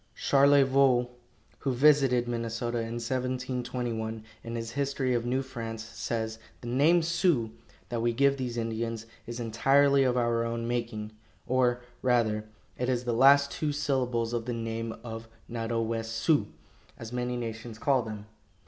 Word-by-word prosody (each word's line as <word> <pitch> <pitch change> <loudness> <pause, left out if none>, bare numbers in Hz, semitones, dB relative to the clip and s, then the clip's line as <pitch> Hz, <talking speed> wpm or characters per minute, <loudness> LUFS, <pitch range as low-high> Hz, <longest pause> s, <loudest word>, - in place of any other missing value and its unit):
Charlevoix, 135 -2 +4 0.5
who 135 - -1
visited 135 -2 +4
Minnesota 120 0 -2
in 115 0 -4
1721, 125 -2 -3 0.2
in 115 0 -5
his 115 0 -4
history 140 -1 -1
of 120 0 0
New 130 +2 0
France, 115 -4 -6
says: 110 0 -4 0.2
"The 120 - -8
name 155 +7 +4
'Sioux,' 165 - +1 0.4
that 120 -1 -2
we 120 0 +2
give 140 +3 +3
these 125 -3 -3
Indians, 115 0 -3 0.2
is 120 +1 -5
entirely 135 +5 +3
of 125 -2 +2
our 120 -1 +1
own 115 0 -3
making; 115 -3 -3 0.3
or, 125 -1 +1 0.2
rather, 115 -4 +2 0.3
it 125 +1 0
is 125 -1 0
the 120 -1 -1
last 140 +3 +6
two 150 -1 -1
syllables 125 -5 0
of 115 -1 -2
the 125 - -2
name 115 0 -3
of 115 -1 -7 0.2
'Nadowessioux,' 115 +4 0 0.5
as 115 +1 -8
many 125 0 -2
nations 115 -1 -6
call 135 +2 +2
them." 110 -2 -7
120 Hz, 145 wpm, -29 LUFS, 115-130 Hz, 0.5 s, last